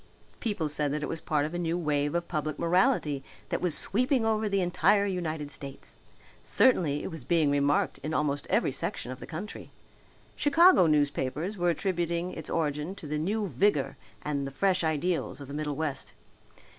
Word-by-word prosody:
People 205 -9 -1
said 150 -1 0
that 150 +1 -2
it - - -1
was 165 - -4
part 150 -2 0
of 155 - -5
a 175 - -2
new 170 0 0
wave 145 -2 0
of 170 0 -1
public 155 -2 -2
morality 170 - +2 0.3
that - - -1
was 175 -4 +1
sweeping 250 +3 +1
over 220 -1 +1
the 200 0 +1
entire 185 +3 +3
United 160 -6 -3
States. 140 -2 -7 0.4
Certainly 160 - +3
it - - -4
was 160 -5 -7
being 155 +1 +2
remarked 145 0 +1
in 155 - -4
almost 145 -2 -1
every - - +2
section 125 - -3
of 130 - -7
the - - -9
country. 180 +7 -7 0.7
Chicago 325 - +6
newspapers 150 +4 0
were 175 -2 +1
attributing 175 0 -1
its 160 - -6
origin 150 +2 -1
to 200 - -10
the 150 +1 -2
new 205 +7 0
vigour 150 - +1 0.3
and 140 -2 -2
the - - -4
fresh 185 +5 +1
ideals 160 +2 -1
of 140 - -8
the 140 - -8
middle 150 -1 -2
west. 150 -3 -3
160 Hz, 180 wpm, -29 LUFS, 145-185 Hz, 0.7 s, Chicago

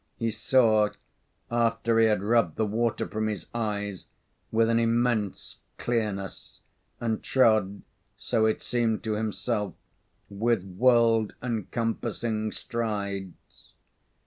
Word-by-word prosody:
He 115 -1 -1
saw, 110 -1 +3 0.6
after 115 -1 +2
he 115 - +6
had 105 -3 +1
rubbed 105 -7 +2
the 110 - +1
water 115 +2 -1
from 110 0 -2
his 105 -4 -3
eyes, 105 -5 -3 0.4
with 115 0 +3
an 115 0 +3
immense 115 -3 0 0.2
clearness, 105 -5 -3 0.4
and 115 -2 -1
trod, 110 -6 +2 0.3
so 110 -1 +1
it 110 - -1
seemed 115 -3 0
to 110 -2 -1
himself 105 -2 -2 0.5
with 110 0 0
world 115 +2 +3
encompassing 115 -1 -2
strides. 100 -6 -5
110 Hz, 110 wpm, -27 LUFS, 105-115 Hz, 0.6 s, he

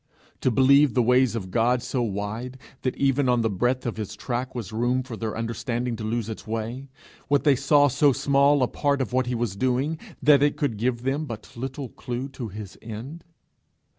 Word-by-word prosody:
to - - +2
believe 135 +2 +5
the 125 - +4
ways 125 0 +3
of 95 -5 -5
God 120 +3 +2
so 130 - -1
wide, 110 +4 -3 0.2
that 130 - -2
even 135 -1 +2
on 125 -1 +3
the 110 -1 0
breadth 125 +6 0
of 115 -2 -3
his 105 -1 -5
track 125 +4 -4
was 110 -5 -5
room 120 +3 +1
for 125 -2 -7
their 110 -1 -4
understanding 115 +1 -2
to 110 - -7
lose 110 0 -2
its 110 -1 -7
way 115 +5 -4 0.4
what 145 -1 +2
they 145 -3 +5
saw, 145 +2 +4
so 145 +2 +4
small 140 +1 +3
a - - +3
part 140 +1 0
of 125 -2 -2
what 130 -1 +1
he 125 - -1
was 115 -4 -2
doing, 130 +7 0 0.2
that 145 -2 +5
it 145 0 +2
could 140 -7 -1
give 120 +2 -1
them 140 +4 -1
but 115 -6 -9
little 130 +2 -5
clue 125 +3 -5
to 130 -3 -6
his 105 -1 -9
end? 115 +9 -8
125 Hz, 205 wpm, -25 LUFS, 115-135 Hz, 0.4 s, believe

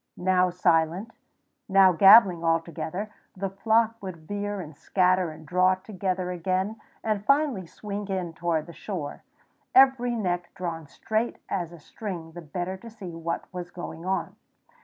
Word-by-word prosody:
Now 185 0 +3
silent, 175 +3 +1 0.6
now 190 -1 +7
gabbling 190 -1 +7
all 165 0 +3
together, 165 +5 -5 0.3
the 195 0 -2
flock 225 +3 +2
would 185 -3 -6
veer 205 0 -3
and 155 -4 -8
scatter 185 +2 +2
and 155 0 -11
draw 185 +3 +3
together 185 -2 -3
again, 185 +5 -1 0.2
and 215 -2 -1
finally 275 - +2
swing 205 +2 -6
in 185 -4 -3
toward 165 -2 -1
the 170 - -11
shore, 170 -9 -5 0.5
every 260 -2 +5
neck 175 -5 -2
drawn 165 -3 -4
straight 220 +8 -2
as 175 -4 -2
a 170 - -11
string 170 0 -7
the 175 +2 -9
better 175 +4 -4
to 230 +5 -11
see 205 -5 -9
what 165 0 -3
was 175 -1 -5
going 170 -2 -8
on. 190 -1 -2
185 Hz, 155 wpm, -26 LUFS, 170-205 Hz, 0.6 s, now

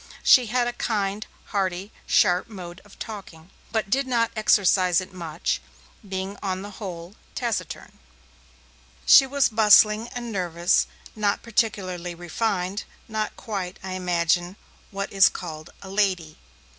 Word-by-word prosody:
She 250 -3 +6
had 240 +2 +1
a 240 - -2
kind, 210 -3 -2 0.2
hearty, 195 0 -2 0.2
sharp 180 -2 +3
mode 180 -4 -9
of 205 - -18
talking, 190 -5 -9 0.2
but 215 -3 -1
did 270 0 +1
not 235 -2 +1
exercise 190 -4 +4
it 185 0 -8
much, 170 -2 -3 0.4
being 195 0 -5
on 190 -1 -3
the 205 - -8
whole 175 -2 -7 0.2
taciturn. 235 -3 -4 1.1
She 270 - +8
was 280 0 +3
bustling 215 0 +5
and 240 -2 -6
nervous, 175 -2 +1 0.3
not 205 -2 0
particularly 185 -6 -1
refined, 185 +2 -2 0.2
not 215 -1 -3
quite, 190 -4 -5
I 190 - -5
imagine, 175 0 0 0.3
what 200 0 -5
is 195 0 +7
called 155 -2 -8
'a 190 - -9
lady'. 185 -6 0
195 Hz, 130 wpm, -24 LUFS, 180-215 Hz, 1.1 s, She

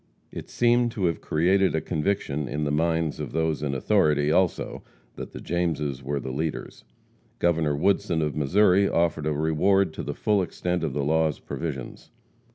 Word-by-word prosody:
It - - -8
seemed 120 0 +2
to 100 -6 -1
have 85 -2 -1
created 95 +3 +2
a - - +2
conviction 75 -4 -2
in 75 +4 -3
the 75 - -1
minds 80 0 0
of - - -5
those 80 -2 0
in 70 -2 -2
authority, 75 +2 +2
also, 90 +1 0 0.3
that - - -7
the - - -8
Jameses 75 -6 -2
were 70 +2 -2
the 65 0 -5
leaders. 75 +4 -4 0.5
Governor 80 -4 +1
Woodson, 85 -1 +1
of 75 -1 -2
Missouri, 95 +6 +3
offered 80 -2 0
a - - +1
reward 80 +5 +2
to - - -5
the - - -5
full 105 -2 +1
extent 90 -1 -2
of 75 -5 -2
the 70 - -1
law's 80 +1 +1
provisions. 70 -6 -6
80 Hz, 170 wpm, -25 LUFS, 75-90 Hz, 0.5 s, Missouri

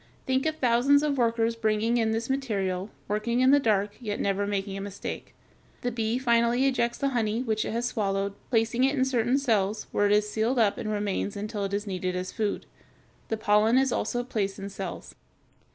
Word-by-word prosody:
Think 265 +3 +1
of 315 - -1
thousands 275 +1 +3
of 285 -3 0
workers 230 -1 +1
bringing 225 +1 +1
in 225 -2 +2
this 225 +1 -1
material, 200 -8 -1 0.2
working 225 +4 0
in 260 +1 +5
the 285 - +6
dark, 205 -4 0
yet 210 -3 -3
never 200 0 0
making 195 -1 -2
a 195 - -5
mistake. 200 0 -7 0.5
The 245 - -1
bee 225 0 -1
finally 240 0 +2
ejects 240 -3 +1
the 275 - 0
honey 230 -2 0
which 220 -3 0
it - - -3
has 235 +1 -1
swallowed, 200 -4 -1 0.2
placing 230 +1 +1
it 270 +2 +3
in 260 -1 +2
certain 250 0 +1
cells, 215 -6 0
where 205 - +2
it - - +1
is 210 0 +3
sealed 220 +4 0
up 215 -4 +2
and 215 - -3
remains 205 -1 -2
until 205 0 -3
it 195 - -5
is 205 +1 -3
needed 185 -2 -3
as 180 0 -3
food. 210 -3 -2 0.6
The 220 - -2
pollen 215 +2 +3
is 265 -1 +3
also 245 0 -1
placed 210 -6 -2
in 195 0 -6
cells. 195 -2 -7
225 Hz, 200 wpm, -27 LUFS, 205-245 Hz, 0.6 s, the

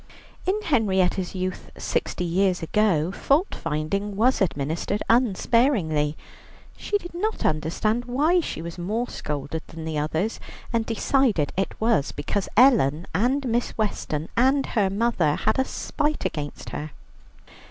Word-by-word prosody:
In 395 +3 +2
Henrietta's 190 - +1
youth, 185 0 -4
sixty - - -2
years 180 +1 +1
ago, 180 -3 +2
fault 285 - +1
finding 165 +6 -2
was 240 +5 +3
administered 165 +4 -1
unsparingly. 210 - +2 0.6
She 415 - -1
did 350 -4 -10
not 425 +6 -2
understand 185 +10 0
why 295 +9 +2
she 310 - -4
was 170 +1 -7
more 215 +8 -1
scolded 150 +2 -4
than 160 0 -8
the 155 -2 -2
others, 160 +8 -1 0.3
and 230 -1 +1
decided 245 +1 +2 0.2
that 190 - +2
it 195 - -4
was 220 -10 +2
because 185 +7 -2
Ellen 190 - +5
and 255 +9 +1
Miss 240 +1 -1
Weston 165 -7 -2
and 265 +3 +3
her 205 -4 +3
mother 195 -7 +1
had 215 +4 0
a 265 - +3
spite 300 +3 -2
against 145 -2 -4
her. 150 +1 -5
200 Hz, 140 wpm, -25 LUFS, 160-245 Hz, 0.6 s, Ellen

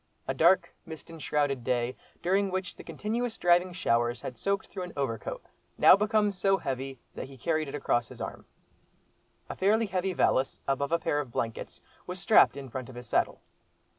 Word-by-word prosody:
A - - 0
dark, 185 -2 +4
mist 160 0 -10
enshrouded 145 -5 -1
day, 125 0 0 0.3
during 195 +2 +2
which 185 -1 -3
the - - -11
continuous 230 +2 -3
driving 175 +1 +3
showers 120 -8 +1
had 125 - -6
soaked 195 - -1
through 185 - -7
an 180 -1 -6
overcoat, 130 -5 -3 0.3
now - - +8
become 210 0 +2
so 195 0 +2
heavy 135 -3 -4 0.2
that - - -6
he 135 0 -13
carried 155 +4 0
it 140 - -5
across 120 -4 0
his - - -12
arm. - - -6 1.0
A - - -6
fairly 215 +4 +3
heavy 190 -1 -1
valise, 135 -5 +1
above 140 +1 0
a 170 - +4
pair 155 -3 0
of 140 -4 -4
blankets, 115 -1 -4 0.3
was 180 +1 -4
strapped 195 -6 +5
in 140 -1 -6
front 130 0 -6
of 130 - -11
his 120 0 -8
saddle. - - 0
160 Hz, 185 wpm, -29 LUFS, 130-190 Hz, 1.0 s, now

